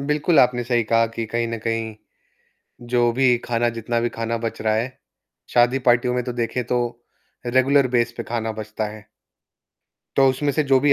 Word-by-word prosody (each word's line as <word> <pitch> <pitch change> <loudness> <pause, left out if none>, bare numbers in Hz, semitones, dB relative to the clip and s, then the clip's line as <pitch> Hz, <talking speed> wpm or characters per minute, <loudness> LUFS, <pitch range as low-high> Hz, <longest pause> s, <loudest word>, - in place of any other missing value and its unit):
बिल्कुल, 150 +3 +1
आपने 125 -1 +2
सही 120 -1 +1
कहा 115 +1 +3
कि 115 0 -5
कहीं, 115 +1 -1
न 115 0 -4
कहीं 115 -1 -2 0.9
जो 120 -1 +3
भी 125 0 +3
खाना 120 0 0
जितना 120 +1 -1
भी 120 - 0
खाना 115 0 -3
बच 115 - -4
रहा 110 0 +1
है 120 +4 -3 0.6
शादी 120 +2 +4
पार्टियों 120 +1 +3
में 125 - 0
तो 125 - -4
देखें 120 +1 -2
तो 125 - 0 0.7
रेगुलर 130 +2 +3
बेस 120 0 +1
पे 115 - -3
खाना 115 -1 -3
बचता 110 0 -4
है। 110 -1 -12 1.1
तो 135 -1 +6
उसमें 145 +3 -1
से 155 - +1
जो 135 -1 +4
भी 145 +1 +4
120 Hz, 185 wpm, -22 LUFS, 115-130 Hz, 1.1 s, तो